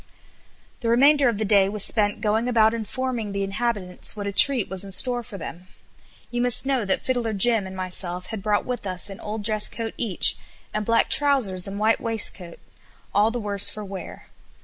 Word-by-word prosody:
'" - - -33
The 230 - -2
remainder 275 +3 +4
of 230 - -2
the 215 - -2
day 200 -2 +3
was 210 -1 -1
spent 205 -3 +2
going 220 +3 0
about 225 -2 +3
informing 230 -1 -4
the 200 0 -2
inhabitants 195 -2 -2
what 205 - -5
a 200 - -2
treat 245 +2 +4
was 190 0 -4
in 195 - -9
store 245 +5 +2
for 220 -3 -10
them. 175 +1 -9 0.6
You 240 0 -2
must 245 +1 +3
know 265 -5 0
that 195 - 0
Fiddler 240 -4 -1
Jim 210 0 +3
and 190 - -9
myself 180 -1 -2
had 215 - -5
brought 205 0 0
with 250 -5 -4
us 185 +2 -3
an 195 - -10
old 210 0 -6
dress 215 0 +3
coat 225 -1 -6
each, 210 -7 +2 0.4
and 210 -1 -3
black 230 0 +2
trousers 250 -11 +3
and 195 +1 -6
white 220 +2 +1
waistcoat, 210 -6 -2 0.6
all 205 +2 +3
the 240 - -4
worse 205 -2 0
for 210 -1 -7
wear. 195 -1 -9
215 Hz, 200 wpm, -23 LUFS, 195-235 Hz, 0.6 s, remainder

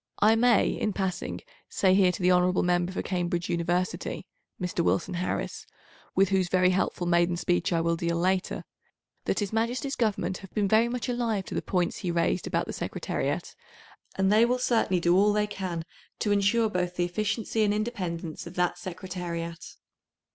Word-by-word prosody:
I 220 +2 +5
may, 235 -1 +4
in 215 - -1
passing, 190 -2 -3 0.3
say 190 -2 +3
here 190 -1 +5
to 180 - -6
the 180 - +5
hon. 180 0 +3
Member 175 0 +1
for 185 - -3
Cambridge 175 -2 -2
University 175 +4 -1 0.3
(Mr. 180 -1 -1
Wilson 175 +2 0
Harris), 180 +1 -3 0.5
with 195 0 +4
whose 190 -2 +1
very 185 0 +4
helpful 185 -1 0
maiden 175 0 +2
speech 175 0 0
I 165 -1 +2
will 170 0 +1
deal 170 0 -1
later, 185 +2 0 0.6
that - - 0
His 205 -1 -2
Majesty's 245 +5 -1
Government 210 -5 -1
have 195 - -12
been 205 -2 +2
very 220 +4 +4
much 240 -3 -3
alive 235 -5 -1
to - - -7
the - - -1
points 180 -2 -1
he 180 - -3
raised 170 +1 0
about - - 0
the - - -6
Secretariat, - - -3 0.6
and 190 +1 +2
they 220 +2 +6
will 245 +2 +2
certainly 230 -7 +2
do 175 +1 +3
all 205 +2 +4
they 210 0 +2
can 180 -5 -4 0.3
to 210 - 0
ensure 205 +3 +3
both 180 -3 -2
the 175 - +1
efficiency 215 +4 -1
and 205 - +2
independence 185 -7 -3
of - - -10
that 180 0 0
Secretariat. 175 -2 -5
185 Hz, 180 wpm, -27 LUFS, 175-210 Hz, 0.6 s, they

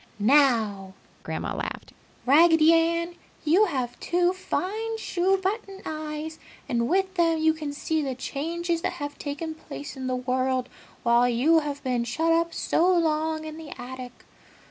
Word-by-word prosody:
"Now!" 215 -6 +3 0.3
Grandma - - -4
laughed, - - -5 0.3
"Raggedy 320 +3 +6
Ann, 335 +1 +1 0.3
you 355 +8 +5
have 255 - -3
two 355 +1 +1
fine 435 +4 -3
shoe 385 -2 +1
button 390 0 -3
eyes 310 0 -5 0.3
and 235 -1 0
with 380 +2 +1
them 335 -3 +2
you 315 0 +3
can 305 -2 -5
see 315 +2 -1
the 270 -3 -3
changes 330 +6 -2
that - - -1
have 290 0 -6
taken 300 +3 -4
place 290 -2 -9
in 260 -1 -5
the 255 - 0
world 255 0 -1 0.3
while 235 +1 +4
you 280 +8 +4
have 290 -2 -5
been 250 -3 0
shut 320 +8 +1
up 335 0 +1
so 350 +2 +2
long 315 -2 +1
in 310 0 -7
the 320 -3 -9
attic! 250 0 -9
310 Hz, 155 wpm, -26 LUFS, 260-335 Hz, 0.3 s, Raggedy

